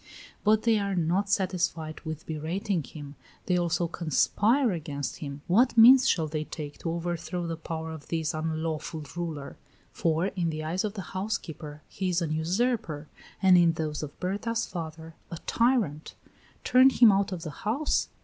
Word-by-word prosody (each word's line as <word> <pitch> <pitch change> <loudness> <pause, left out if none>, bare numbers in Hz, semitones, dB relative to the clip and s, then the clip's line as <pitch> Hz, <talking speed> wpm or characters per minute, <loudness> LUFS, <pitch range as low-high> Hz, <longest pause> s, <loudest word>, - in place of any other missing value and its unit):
But 215 +1 +3
they 225 -2 +3
are 200 -1 -1
not 180 +4 +1
satisfied 170 -5 -1
with 160 -1 -6
berating 165 +4 -2
him; 145 0 -10 0.3
they 180 - +1
also 175 0 +1
conspire 205 - +2
against 145 -5 -4
him. 140 -1 -7
What 235 +8 +3
means 255 +3 +8
shall 165 -3 +2
they 155 0 -3
take 150 -3 -7
to 165 - -3
overthrow 170 +1 -3
the 165 0 -3
power 160 0 -5
of 160 -2 -9
this 160 -2 -1
unlawful 160 0 -3
ruler? 160 -5 -5 0.3
for 165 +1 0
in 175 -3 -1
the 155 -1 -4
eyes 170 +4 -1
of 215 0 -3
the 195 - -4
housekeeper 160 -7 -4
he 190 -1 -3
is 175 -1 +1
a 160 -3 -1
usurper, 165 - -1 0.3
and 185 -2 +7
in 170 -1 +4
those 155 -2 -3
of 150 -2 -8
Berta's 215 +5 -1
father, 160 -1 -7 0.2
a 170 - -6
tyrant; 230 - +1 0.5
turn 255 +1 +6
him 240 -4 +6
out 195 0 +1
of 175 -3 -5
the 155 - -5
house? 235 +8 0
170 Hz, 170 wpm, -28 LUFS, 155-200 Hz, 0.5 s, means